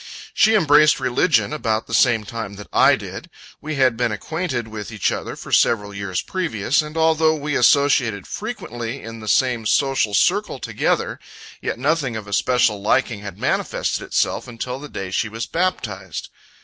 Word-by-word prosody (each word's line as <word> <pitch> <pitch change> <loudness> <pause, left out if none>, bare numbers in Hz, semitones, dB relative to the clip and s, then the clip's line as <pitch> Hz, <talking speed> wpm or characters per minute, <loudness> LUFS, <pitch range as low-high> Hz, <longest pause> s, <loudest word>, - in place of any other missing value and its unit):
She 220 0 +4
embraced 150 -6 +5
religion 135 +5 +2
about 110 -7 -1
the - - -9
same 115 -4 +4
time 110 -2 -6
that 105 +1 -9
I - - +6
did. - - -8 0.3
We 155 0 -4
had 130 -4 +3
been 120 -1 0
acquainted 130 - -3
with 110 0 -7
each 105 -4 0
other - - -4
for - - -10
several 105 -3 +2
years 100 -2 -3
previous, 155 - 0
and 150 +1 -8
although 160 0 +3
we 150 -1 -3
associated 125 -6 +3
frequently 135 - -6
in 115 0 -8
the 110 - -9
same 120 -1 +2
social 135 -7 +2
circle - - +2
together; - - -1 0.4
yet - - -3
nothing 140 -2 0
of 110 -2 -5
a 100 - -8
special 115 -2 +2
liking 110 +1 +1
had 100 -2 -8
manifested - - -1
itself - - -1
until 125 +2 -5
the 145 +1 -9
day 95 -1 -6
she 110 +4 -1
was 115 +2 -4
baptized. 105 - -3
120 Hz, 170 wpm, -21 LUFS, 105-150 Hz, 0.4 s, I